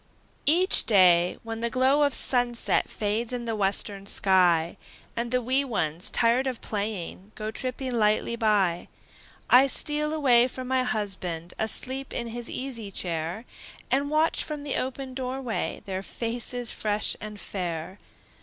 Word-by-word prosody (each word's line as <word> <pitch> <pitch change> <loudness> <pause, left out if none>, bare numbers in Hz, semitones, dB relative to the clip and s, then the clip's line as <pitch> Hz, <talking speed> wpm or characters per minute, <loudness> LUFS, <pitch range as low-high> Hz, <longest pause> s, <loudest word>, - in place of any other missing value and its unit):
Each 355 +6 +3
day, 180 -4 +5
when 225 0 -5
the 235 +1 -1
glow 260 +4 +3
of 285 -2 +5
sunset 245 -2 +1
Fades 220 +3 -2
in 245 -1 -3
the 225 -1 -2
western 200 0 -1
sky, 175 -5 +3 0.4
And 235 0 -2
the 250 0 0
wee 260 +4 +2
ones, 175 - -2
tired 245 +3 +2
of 255 -3 -3
playing, 205 -2 -4
Go 215 0 -4
tripping 255 +2 -3
lightly 215 +1 +2
by, 205 -7 +1 0.6
I 260 +2 +7
steal 300 +2 +2
away 255 -6 +4
from 255 0 -7
my 260 0 +2
husband, 185 -8 -3
Asleep 260 +4 -1
in 235 -1 -3
his 240 +1 -6
easy 245 -6 -5
chair, 175 +3 -3 0.5
And 280 +2 +1
watch 310 +2 +2
from 300 -2 -5
the 285 - -3
open 260 0 -3
door 260 0 -3
way 245 -4 -3
Their 190 -1 -3
faces 235 +3 -2
fresh 210 0 0
and 210 -1 -7
fair. 175 -1 -5
230 Hz, 150 wpm, -26 LUFS, 200-255 Hz, 0.6 s, I